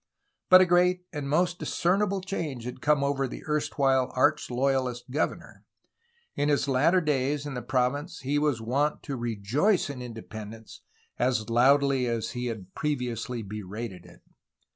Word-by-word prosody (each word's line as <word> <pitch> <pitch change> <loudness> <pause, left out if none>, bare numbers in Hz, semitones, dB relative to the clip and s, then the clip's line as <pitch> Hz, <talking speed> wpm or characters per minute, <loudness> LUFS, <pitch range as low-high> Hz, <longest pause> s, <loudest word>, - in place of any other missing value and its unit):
But 185 0 +9
a - - +6
great 180 +1 +3
and 145 -2 -4
most 175 +3 +1
discernible 195 +2 0
change 165 - -4
had 125 +1 -7
come 150 -1 +3
over 140 -1 0
the - - -8
erstwhile 135 -4 +1
arch 145 +4 +2
loyafist 125 -1 -1
governor. 150 +4 -3 0.7
In 145 +1 +1
his 145 -1 +2
latter 150 +8 +3
days 145 -1 0
in 145 - -5
the 125 - -4
province 135 +7 -1
he 140 +3 0
was 145 -5 +1
wont 135 +7 -1
to 140 - -4
'^rejoice" 120 - 0
in 130 -3 -8
independence 110 -2 -9 0.4
as 120 -3 0
loudly 135 +1 +4
as 115 -2 -2
he 125 0 -3
had 100 -5 -6
previously 125 -5 -3
berated 100 -2 -7
it. 85 - -17
135 Hz, 150 wpm, -27 LUFS, 120-150 Hz, 0.7 s, But